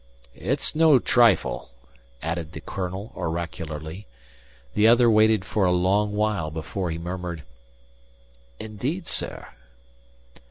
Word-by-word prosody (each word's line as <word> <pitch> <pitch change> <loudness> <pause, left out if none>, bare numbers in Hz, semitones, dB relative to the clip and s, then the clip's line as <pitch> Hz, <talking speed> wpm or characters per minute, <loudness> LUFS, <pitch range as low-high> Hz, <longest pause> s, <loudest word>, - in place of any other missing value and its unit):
"It's 135 - -1
no 155 -3 +6
trifle," 115 - +2 0.5
added 80 0 -3
the - - -6
colonel 95 +2 -5
oracularly. 80 +1 -5 0.7
The 105 - +4
other 120 0 +6
waited 110 -2 +4
for 105 - 0
a 90 - +3
long 100 +4 +2
while 105 -6 0
before 80 +4 -4
he 80 - -3
murmured: 85 -2 -5 1.2
"Indeed, 130 - -4
sir!" - - -2
95 Hz, 110 wpm, -24 LUFS, 85-110 Hz, 1.2 s, no